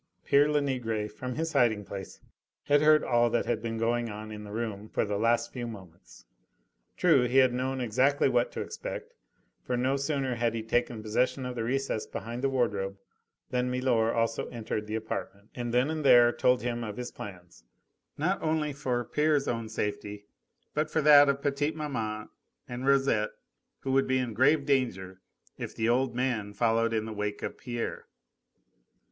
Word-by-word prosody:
Pere 145 +1 +4
Lenegre, 125 -7 0
from 125 +4 -6
his 160 0 -2
hiding 110 -4 +2
place, 95 -1 -8 0.4
had 145 0 +3
heard 155 0 +5
all 120 -1 +3
that 120 - 0
had 115 -2 -1
been 115 0 -3
going 120 +1 0
on 105 +1 -7
in 105 0 -7
the 105 - -9
room 110 -2 -4
for - - 0
the 105 0 -2
last 115 +2 +1
few 120 -2 -4
moments. 90 - -12 0.7
True, 140 -8 +4
he 125 +3 +1
had 130 -2 +6
known 130 +1 -2
exactly 130 +5 +2
what 120 -2 +1
to - - -3
expect, - - -6 0.5
for 125 - -1
no 130 +3 +1
sooner 140 -2 -1
had 115 -1 0
he 110 - -3
taken 120 -1 -1
possession 125 +4 0
of 125 - -3
the 115 -2 -3
recess 130 -2 -1
behind 120 +2 -6
the 135 - +2
wardrobe 100 -7 -1 0.5
than 125 0 0
milor 125 -3 +1
also 115 -1 0
entered 110 -3 -4
the 110 - -3
apartment 105 -2 -5
and 120 -1 -4
then 125 +5 +2
and 155 -1 -3
there 120 -3 +7
told 125 0 +2
him 120 -1 -2
of 105 -2 -6
his 125 0 -5
plans 90 -10 -10 0.5
not 175 +6 0
only 155 -2 0
for 125 -3 -2
pere's 150 -2 +1
own 115 -2 -2
safety, 105 -1 -4 0.5
but 150 +1 0
for 155 -1 0
that 145 -1 +8
of 140 0 -1
petite 145 +2 0
maman 110 -9 -3 0.4
and 125 +2 -5
Rosette 135 -6 +3 0.5
who 135 - -2
would 135 0 +3
be 130 0 +2
in 125 -3 -2
grave 140 +6 +3
danger 95 -10 -1 0.4
if - - -6
the 110 - 0
old 125 +1 +1
man 120 -5 -1
followed 115 +1 +2
in 110 -1 0
the 110 - -5
wake 105 0 -3
of - - -4
Pierre. 120 -1 -5
120 Hz, 180 wpm, -29 LUFS, 110-135 Hz, 0.7 s, that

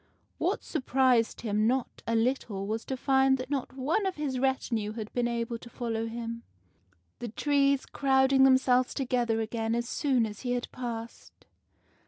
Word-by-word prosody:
What - - 0
surprised 255 -5 +1
him 215 -1 +1
not 255 +1 -1
a 230 - +1
little 225 -4 0
was 220 +2 -3
to 265 - -3
find 265 0 +3
that 255 +2 -7
not 270 -2 -2
one 320 +10 +1
of 380 - -2
his 280 -4 -2
retinue 235 -5 0
had 220 -2 -7
been 245 -1 +1
able 235 0 -2
to 235 - -12
follow 230 -1 -3
him, 230 0 -5 0.8
the 240 - -4
trees 280 +3 +2
crowding 265 -1 +3
themselves 260 -1 +4
together 240 -4 0
again 225 0 -2
as 235 0 -2
soon 260 -4 +1
as 210 -1 -7
he 245 -1 -2
had 245 0 -3
passed. 235 -2 -7
245 Hz, 165 wpm, -29 LUFS, 230-265 Hz, 0.8 s, themselves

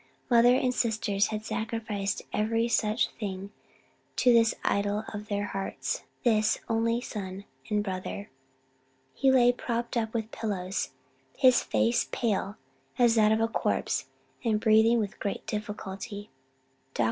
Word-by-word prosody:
Mother 240 +1 +6
and 255 -1 +1
sisters 220 -4 +1
had 215 0 -4
sacrificed 220 -3 -3
every 225 +2 +1
such 220 -1 +1
thing 195 -2 -5 0.6
to 250 -1 +4
this 230 -1 +4
idol 205 +1 0
of 210 0 -6
their 205 0 -1
hearts, 195 -1 -3 0.2
this 220 -2 +3
only 230 +1 +1
son 195 -4 -6 0.2
and 210 -1 +1
brother. 190 +1 -5 0.8
He 270 - +2
lay 245 -2 +6
propped 235 0 -3
up 225 -2 0
with 220 -1 -2
pillows, 195 -4 -3 0.5
his 255 -2 +6
face 110 +2 +1
pale 205 -3 -1 0.4
as 240 -2 +5
that 215 -2 +4
of 220 +1 +2
a 225 - +3
corpse, 230 - -1 0.4
and 220 -3 +2
breathing 220 +2 +5
with 210 -3 -3
great 200 - -3
difficulty. 205 - -5 0.6
Dr. - - -7
215 Hz, 135 wpm, -28 LUFS, 205-230 Hz, 0.8 s, Mother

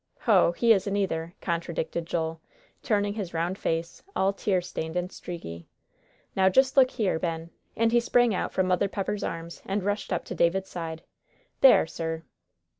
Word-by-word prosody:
"Hoh! 190 -6 +4
he 230 +5 +5
isn't 200 0 0
either," 170 -4 -2
contradicted 170 -1 -2
Joel, 165 -1 -2 0.4
turning 205 -2 +1
his 200 -6 -5
round 175 +4 -1
face, 165 -1 -2
all 195 +1 +2
tear 195 -1 +1
stained 170 -2 -5
and 180 +1 -1
streaky. 85 - -8 0.7
"Now 190 0 +5
just 265 +7 +3
look 260 -2 +6
here, 195 -10 0
Ben," 165 -1 -3 0.2
and 230 0 +2
he 240 - +5
sprang 240 -1 +3
out 185 - -2
from 185 - +1
Mother 185 +2 +2
Pepper's 200 +1 -3
arms 165 0 -5
and 195 0 -2
rushed 205 +1 -2
up 175 - -1
to - - -5
David's 190 +3 +1
side. 165 -1 -5 0.6
"There, 265 - +7
sir!" 160 0 -4
180 Hz, 170 wpm, -27 LUFS, 165-205 Hz, 0.7 s, There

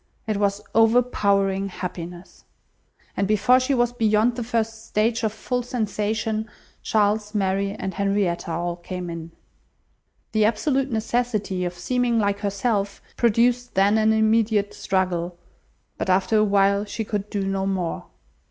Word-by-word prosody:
It 215 -2 -1
was 200 0 0
overpowering 200 -4 +2
happiness. 180 -1 -7 0.7
And 200 - 0
before 215 +5 +4
she 265 +2 0
was 240 -1 +1
beyond 225 0 +2
the 245 - -3
first 225 -1 -2
stage 225 +2 +1
of 220 -2 0
full 245 +3 -2
sensation, 220 -2 -2 0.3
Charles, 210 0 +1
Mary, 195 0 0
and 190 -1 -4
Henrietta 195 -3 0
all 170 +1 -2
came 180 0 -6
in. 165 -1 -7 1.0
The 215 -1 +2
absolute 265 +5 +1
necessity 220 -5 -1
of 175 0 -4
seeming 245 +5 0
like 200 -2 +1
herself 200 0 -1 0.2
produced 240 +2 +2
then 200 +3 +4
an 220 0 +4
immediate 220 -1 +2
struggle; 180 -2 -1 0.6
but - - -2
after 190 +4 +2
a 215 - +5
while 200 0 +3
she 215 +1 -4
could 210 -1 -3
do 200 -2 -2
no 195 0 -1
more. 185 -4 -2
210 Hz, 140 wpm, -23 LUFS, 195-225 Hz, 1.0 s, a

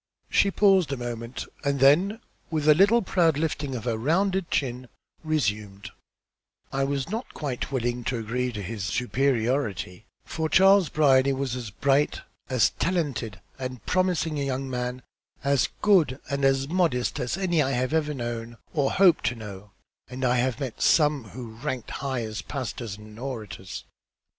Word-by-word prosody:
She 200 - +4
paused 195 -5 +4
a 135 - -2
moment, 120 0 -5 0.2
and 140 -1 0
then 180 - +4 0.3
with 155 -2 -1
a 155 - +9
little 205 +8 +4
proud 170 -5 +2
lifting 145 -3 -2
of 115 - -5
her 115 -2 -1
rounded 185 - +1
chin, 125 -2 -1 0.4
resumed 105 -10 -2 0.8
"I 135 0 +1
was 140 -1 -2
not 225 +4 -4
quite 140 -3 -4
willing 120 -2 -1
to 125 - -1
agree 120 +3 -2
as 120 - -5
to 100 - -4
the 110 - -6
superiority; 120 -2 -1 0.2
for 160 -1 -2
Charles 190 -1 +5
Brierly 140 -3 +4
was 135 -2 -2
as 120 -4 -5
bright, 140 +7 +1 0.3
as 130 -4 +3
talented 145 - -1 0.2
and 125 -4 -6
promising 180 -4 +1
a - - 0
young 135 0 -2
man, 125 0 -3 0.4
as 140 -2 +2
good 165 -11 +4
and 140 0 -1
as 135 0 +3
modest 155 -7 0
as 125 +6 -2
any 175 -4 +1
I 135 -1 0
ever 150 +5 0
knew 120 -3 -5 0.2
or 145 -4 +1
hope 185 -4 +5
to 120 - +1
know, 105 -3 -9 0.4
and 130 +1 -3
I 125 0 +3
have 125 +1 0
met 130 -5 -5
some 150 -5 +3
who 115 +2 -8
rank 125 +1 -5
high 130 -4 -3
as 110 -1 -5
pastors 120 -5 -5
and 105 +1 -13
orators." 110 -8 -6
135 Hz, 160 wpm, -26 LUFS, 120-155 Hz, 0.8 s, a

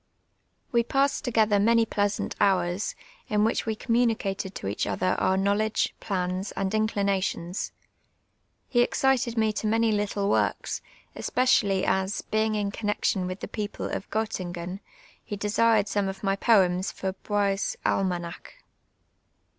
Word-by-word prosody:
We 235 -1 +3
j)assed 275 +3 +1
together 220 -4 +2
many 230 +2 +4
pleasant 205 -1 -1
hours, 185 -1 +1 0.3
in 210 -1 +2
which 225 +1 0
we 220 - 0
communicated 220 -5 0
to - - -6
each 100 +1 -1
other 105 - 0
our 190 - +2
knowledge, 205 +3 +1
plans, 185 0 -2
and 195 0 -2
inclinations. 200 -4 -1 1.0
He 240 - +3
excited 250 -1 +1
me 220 -1 +2
to 215 - -2
many 225 +1 +2
little 205 -1 0
works, - - 0 0.3
especially 205 -7 +2
as, 190 +1 0
being 215 0 0
in 205 -1 -1
connexion 205 -3 -1
with 185 +1 -6
the - - -4
])eoj)le 210 -1 -4
of - - -6
Gottingen, 185 -4 -3 0.4
he 205 - -5
desired 210 +1 +2
some 205 -1 0
of 195 +1 -6
my 195 0 +2
poems 190 -4 +3
for 190 -1 -3
lioie's 200 0 -1
Ahnanaclt. 175 -3 -1
205 Hz, 135 wpm, -27 LUFS, 190-220 Hz, 1.0 s, many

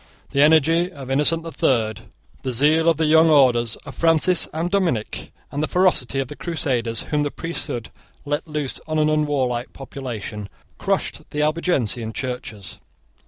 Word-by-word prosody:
The 140 - +2
energy 160 +4 +4
of 135 -6 -8
Innocent 150 +4 +3
the 165 - -7
Third, 110 -8 0 0.4
the 130 - -3
zeal 155 +6 +3
of 165 - +2
the 160 - +1
young 160 +1 +5
orders 120 -6 +4
of 140 - -8
Francis 165 +2 +3
and 165 +3 -3
Dominic, 170 - -1 0.2
and 145 - -2
the 155 - 0
ferocity 180 -8 +2
of 135 - -1
the 145 - -9
Crusaders 125 -10 -1
whom 150 -1 +2
the 145 - 0
priesthood 140 -8 -5 0.3
let 145 +3 -2
loose 150 -4 -3
on 155 0 -1
an 155 0 +3
unwarlike 135 -5 0
population, 115 -6 -7 0.3
crushed - - -2
the 150 0 -1
Albigensian 135 - 0
churches. 120 -7 -6
145 Hz, 160 wpm, -22 LUFS, 125-160 Hz, 0.4 s, young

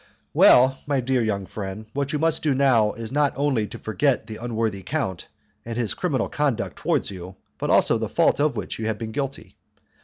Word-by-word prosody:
"Well, 130 +2 +6
my 140 -2 +1
dear 130 0 +1
young 100 -3 -1
friend, 100 +2 -6
what 140 0 -2
you 150 - 0
must 160 +1 +1
do 145 -4 +1
now 125 -6 +3
is 115 0 -7
not 145 0 +2
only 135 -6 0
to - - -9
forget 125 +3 0
the 110 -1 -8
unworthy 110 -4 -2
count 95 - -3 0.4
and 115 0 -6
his 120 -3 0
criminal 140 -10 -1
conduct 145 -6 -1
towards - - 0
you, 90 0 -9 0.2
but - - -2
also - - +4
the - - -3
fault - - +2
of 150 0 +2
which - - -5
you 110 - -2
have 110 -1 -1
been 110 -1 -5
guilty. 135 +2 -5
120 Hz, 205 wpm, -24 LUFS, 110-140 Hz, 0.4 s, Well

